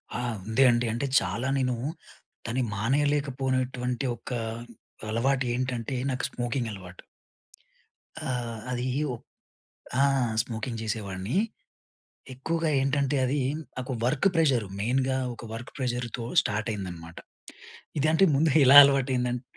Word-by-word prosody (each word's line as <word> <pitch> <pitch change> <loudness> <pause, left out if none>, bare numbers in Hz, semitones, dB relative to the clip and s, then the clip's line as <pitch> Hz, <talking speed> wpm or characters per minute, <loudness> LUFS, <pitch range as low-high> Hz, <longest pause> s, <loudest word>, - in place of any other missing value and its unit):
ఆ! - - -1 0.3
ఉంది 110 +5 +3
అండి, 120 0 +1
అంటే 120 +4 -2
చాలా 100 +7 -3
నేను 125 -2 0 0.7
దాని 120 +3 -1
మానేయలేకపోయినటువంటి 130 0 0
ఒక 115 +2 -11 0.8
అలవాటు 130 +4 +1
ఏంటంటే, 125 0 -2 0.2
నాకు 130 - -2
స్మోకింగ్ 120 0 -2
అలవాటు. 90 -3 -10 1.3
ఆహ్, 120 -3 -3
అది 125 0 -2 0.2
వో 125 - -2 0.9
ఆ! - - +6 0.4
స్మోకింగ్ 115 0 -5
చేసేవాడిని. 105 - -3 1.0
ఎక్కువగా 165 +5 -1
ఏంటంటే 140 +1 +1
అది 140 +3 0 0.4
నాకు 130 +1 -4
వర్క్ 135 +9 +2
ప్రెషర్ 140 -10 +2
మెయిన్‌గా 130 +4 +1 0.2
ఒక 115 - -11
వర్క్ 115 +2 -7
ప్రెషర్‌తో 120 -2 -3 0.2
స్టార్ట్ 105 +2 -2
అయింది 100 -3 -4
అన్నమాట. 85 0 -11 0.8
ఇది 145 - +2
అంటే 160 +4 +5
ముందు, 155 +3 +3
ఎలా 135 +2 +8
అలవాటు 140 -1 +3
అయింది 125 -1 0
ఆంట్ 125 0 -4
125 Hz, 125 wpm, -27 LUFS, 115-135 Hz, 1.3 s, ఎలా